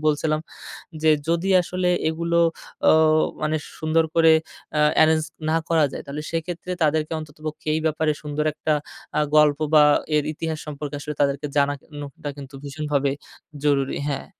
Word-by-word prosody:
বলছিলাম 155 Hz, 0 st, +1 dB, 0.6 s
যে, 160 Hz, -, +4 dB, 0.2 s
যদি 170 Hz, +3 st, +1 dB
আসলে 180 Hz, +1 st, -1 dB, 0.2 s
এগুলো 170 Hz, +1 st, 0 dB, 0.5 s
ও -, -, +8 dB, 0.5 s
মানে 155 Hz, +1 st, +1 dB, 0.2 s
সুন্দর 160 Hz, +1 st, +2 dB
করে 165 Hz, -1 st, +6 dB, 0.5 s
আ -, -, +3 dB, 0.2 s
এ্যারেঞ্জ 155 Hz, 0 st, +5 dB, 0.3 s
না 160 Hz, -, +2 dB
করা 160 Hz, -3 st, +4 dB
যায় -, -, -6 dB
তাহলে 145 Hz, +2 st, -5 dB
সেক্ষেত্রে 170 Hz, +2 st, -4 dB
তাদেরকে 155 Hz, +1 st, +1 dB
অন্ততপক্ষে 155 Hz, 0 st, -8 dB
এই -, -, +1 dB
ব্যাপারে 155 Hz, 0 st, +1 dB
সুন্দর 150 Hz, 0 st, -3 dB
একটা 155 Hz, 0 st, -1 dB, 0.5 s
আ -, -, +3 dB
গল্প 150 Hz, -1 st, +5 dB
বা 150 Hz, -1 st, +8 dB, 0.3 s
এর 150 Hz, -, +3 dB
ইতিহাস 160 Hz, 0 st, -4 dB
সম্পর্কে 150 Hz, -1 st, -6 dB
আসলে 150 Hz, 0 st, -5 dB
তাদেরকে 140 Hz, +1 st, 0 dB
জানানোটা 145 Hz, +2 st, -2 dB
কিন্তু 140 Hz, 0 st, -10 dB
ভীষণভাবে 140 Hz, -1 st, -1 dB, 0.5 s
জরুরি। 140 Hz, -2 st, +1 dB
হ্যাঁ। 140 Hz, -2 st, -3 dB
155 Hz, 145 wpm, -23 LUFS, 145-160 Hz, 0.6 s, ও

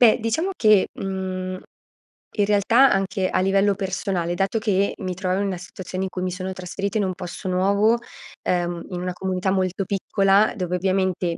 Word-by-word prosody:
Beh, 235 Hz, -2 st, +6 dB
diciamo 230 Hz, -, 0 dB
che, 215 Hz, -4 st, +5 dB
mhmm, 185 Hz, -1 st, -4 dB, 0.7 s
in 205 Hz, -, +1 dB
realtà 210 Hz, +6 st, +4 dB
anche 195 Hz, -1 st, 0 dB
a -, -, +1 dB
livello 195 Hz, +2 st, +3 dB
personale, 190 Hz, -3 st, -2 dB
dato 195 Hz, +4 st, 0 dB
che 200 Hz, -2 st, +1 dB
mi 185 Hz, -1 st, -3 dB
trovavo 185 Hz, +1 st, -1 dB
in 200 Hz, -, 0 dB
una 190 Hz, -2 st, -2 dB
situazione 185 Hz, +1 st, -6 dB
in 190 Hz, -, -2 dB
cui 185 Hz, -, -5 dB
mi 185 Hz, 0 st, -1 dB
sono 185 Hz, +1 st, -4 dB
trasferita 190 Hz, +3 st, -3 dB
in 205 Hz, -, +1 dB
un 185 Hz, -, -1 dB
posto 180 Hz, +2 st, -7 dB
nuovo, 200 Hz, +5 st, +3 dB, 0.5 s
uhm, 175 Hz, -1 st, -1 dB
in 180 Hz, -2 st, -4 dB
una 180 Hz, 0 st, -3 dB
comunità 185 Hz, +1 st, -2 dB
molto 190 Hz, 0 st, 0 dB
piccola, 195 Hz, +1 st, +2 dB
dove 180 Hz, -4 st, -2 dB
ovviamente 185 Hz, -2 st, 0 dB
190 Hz, 180 wpm, -23 LUFS, 185-200 Hz, 0.7 s, Beh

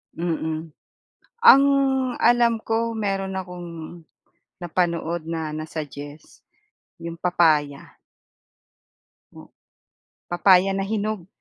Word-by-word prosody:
Mm. 160 Hz, -2 st, -4 dB, 0.7 s
Ang 275 Hz, -, +9 dB, 0.6 s
alam 235 Hz, -1 st, +4 dB
ko 230 Hz, +1 st, -1 dB
meron 195 Hz, -3 st, -2 dB
akong 180 Hz, -2 st, -6 dB, 0.9 s
napanood 170 Hz, -1 st, -1 dB
na 160 Hz, -1 st, -4 dB
na-suggest, 150 Hz, -1 st, -8 dB, 0.6 s
'yong 170 Hz, 0 st, -7 dB
papaya. 155 Hz, -5 st, +1 dB, 1.4 s
Oh. -, -, -13 dB, 0.8 s
Papaya 185 Hz, +2 st, +4 dB
na 195 Hz, -, -1 dB
hinog. 210 Hz, -2 st, -3 dB
175 Hz, 80 wpm, -23 LUFS, 160-195 Hz, 1.4 s, Ang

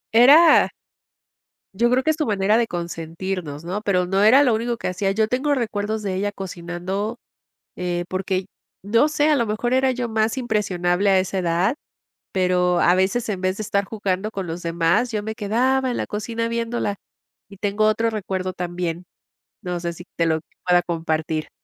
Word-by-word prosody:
Era 295 Hz, +7 st, +7 dB, 1.1 s
Yo 235 Hz, +3 st, +2 dB
creo 255 Hz, +1 st, +2 dB
que 315 Hz, -, +3 dB
es 310 Hz, -, -3 dB
su 305 Hz, -, -1 dB
manera 205 Hz, +1 st, +2 dB
de 230 Hz, -, +1 dB
consentirnos, 170 Hz, -2 st, -5 dB
¿no? 195 Hz, +4 st, -3 dB
Pero 180 Hz, -4 st, +1 dB
no 195 Hz, +2 st, +1 dB
era 255 Hz, +7 st, +7 dB
lo 245 Hz, -4 st, +3 dB
único 235 Hz, +1 st, -1 dB
que -, -, -4 dB
hacía, 195 Hz, +2 st, -1 dB
yo 215 Hz, +2 st, +1 dB
tengo 280 Hz, +4 st, 0 dB
recuerdos 215 Hz, -2 st, -2 dB
de 195 Hz, -2 st, -2 dB
ella 205 Hz, +2 st, -1 dB
cocinando, 190 Hz, +4 st, -4 dB, 0.6 s
eh, 175 Hz, -1 st, -2 dB
porque, 185 Hz, 0 st, -2 dB, 0.4 s
no 230 Hz, +8 st, +3 dB
sé, 300 Hz, 0 st, +1 dB
a 305 Hz, -, +4 dB
lo 240 Hz, -4 st, +2 dB
mejor 230 Hz, +4 st, -1 dB
era 260 Hz, 0 st, +3 dB
yo 250 Hz, -1 st, -2 dB
más 220 Hz, +3 st, 0 dB
impresionable 200 Hz, -5 st, 0 dB
a 190 Hz, -, +5 dB
esa 190 Hz, +1 st, -1 dB
edad, 180 Hz, +7 st, +1 dB, 0.6 s
pero 180 Hz, -1 st, +2 dB
a 175 Hz, -, +5 dB
veces, 195 Hz, +6 st, +1 dB
en 190 Hz, -3 st, -3 dB
vez 185 Hz, +1 st, 0 dB
de 215 Hz, -, -4 dB
estar 200 Hz, -1 st, 0 dB
jugando 205 Hz, -1 st, -2 dB
con 195 Hz, -4 st, -5 dB
los 165 Hz, +2 st, -5 dB
demás, 170 Hz, +8 st, +1 dB
yo 210 Hz, -1 st, -1 dB
me 220 Hz, +1 st, -4 dB
quedaba 255 Hz, +5 st, +1 dB
en -, -, -2 dB
la -, -, -2 dB
cocina 230 Hz, +2 st, -3 dB
viéndola. 230 Hz, -3 st, -2 dB, 0.5 s
Y 200 Hz, -, -13 dB
tengo 205 Hz, +2 st, 0 dB
otro 225 Hz, +1 st, +2 dB
recuerdo 190 Hz, -3 st, -3 dB
también. 175 Hz, -1 st, -4 dB, 0.6 s
No 180 Hz, -2 st, -3 dB
sé 170 Hz, 0 st, -3 dB
si 175 Hz, -, -11 dB
te 165 Hz, -, +2 dB
lo 160 Hz, -1 st, +1 dB, 0.3 s
pueda 175 Hz, 0 st, +4 dB
compartir. 160 Hz, -2 st, -2 dB
200 Hz, 185 wpm, -22 LUFS, 180-230 Hz, 1.1 s, Era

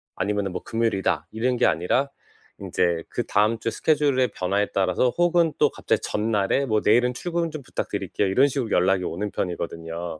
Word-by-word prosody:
아니면은 100 Hz, 0 st, -1 dB
뭐 90 Hz, -, -5 dB
금요일이다 115 Hz, -4 st, -1 dB
이런 125 Hz, +3 st, 0 dB
게 -, -, +2 dB
아니라 125 Hz, -, +1 dB, 0.5 s
인제 85 Hz, -2 st, 0 dB
그다음 110 Hz, +2 st, +1 dB
주 115 Hz, -, -2 dB
스케줄의 140 Hz, -4 st, +2 dB
변화에 100 Hz, +3 st, 0 dB
따라서 95 Hz, +6 st, +2 dB
혹은 175 Hz, -2 st, +3 dB
또 -, -, +4 dB
갑자기 -, -, -1 dB
전날에 105 Hz, +4 st, 0 dB
뭐 110 Hz, -3 st, +1 dB
"내일은 120 Hz, +3 st, +3 dB
출근 170 Hz, +5 st, -2 dB
좀 155 Hz, -, -6 dB
부탁드릴게요." 105 Hz, -4 st, -3 dB
이런 130 Hz, +9 st, +4 dB
식으로 130 Hz, -6 st, -3 dB
연락이 95 Hz, +1 st, +2 dB
오는 100 Hz, +4 st, -3 dB
편이거든요. 85 Hz, -2 st, -4 dB
105 Hz, 405 characters per minute, -24 LUFS, 95-130 Hz, 0.5 s, 또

